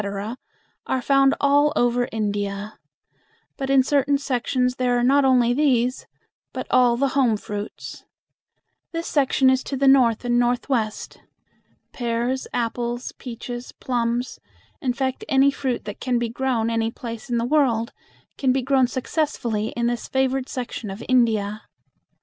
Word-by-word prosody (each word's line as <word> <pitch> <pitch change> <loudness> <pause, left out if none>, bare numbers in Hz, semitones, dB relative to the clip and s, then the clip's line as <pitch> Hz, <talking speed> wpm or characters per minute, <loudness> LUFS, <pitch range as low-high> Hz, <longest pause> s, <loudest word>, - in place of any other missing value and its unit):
are 260 - 0
found 275 +1 +3
all 285 +1 +4
over 245 0 +1
India; 205 -1 -3 0.8
but 270 -1 -4
in 270 -1 +5
certain 285 +1 +2
sections 255 -2 -1
there 245 -1 +1
are 240 - +1
not 275 +3 +4
only 250 -2 +4
these, 255 -3 +1 0.5
but - - -4
all 245 -2 +4
the 275 +2 +1
home 255 -6 +2
fruits. 205 0 -7 0.9
This 330 0 -3
section 270 -2 +3
is 260 0 +1
to 275 - -3
the 275 +1 +2
north 250 -4 +4
and 240 0 +2
northwest. 240 -2 -1 0.7
Pears, 240 +2 -2
apples, 240 +1 -2
peaches, 240 0 -7
plums 240 0 -2 0.4
in 255 -5 0
fact, 260 +1 -2
any 275 0 +4
fruit 265 -3 -3
that 205 -1 -7
can 250 -1 0
be 235 -1 -1
grown 235 -2 -1
any 225 0 0
place 230 +2 -8
in 240 - 0
the 230 - 0
world 245 -5 +1 0.5
can 265 -2 +2
be 260 0 0
grown 265 -1 +3
successfully 245 -5 -2
in 235 - 0
this 240 0 -2
favored 265 0 0
section 245 -4 -5
of 195 +4 -7
India. 220 -4 +2
245 Hz, 145 wpm, -23 LUFS, 235-265 Hz, 0.9 s, in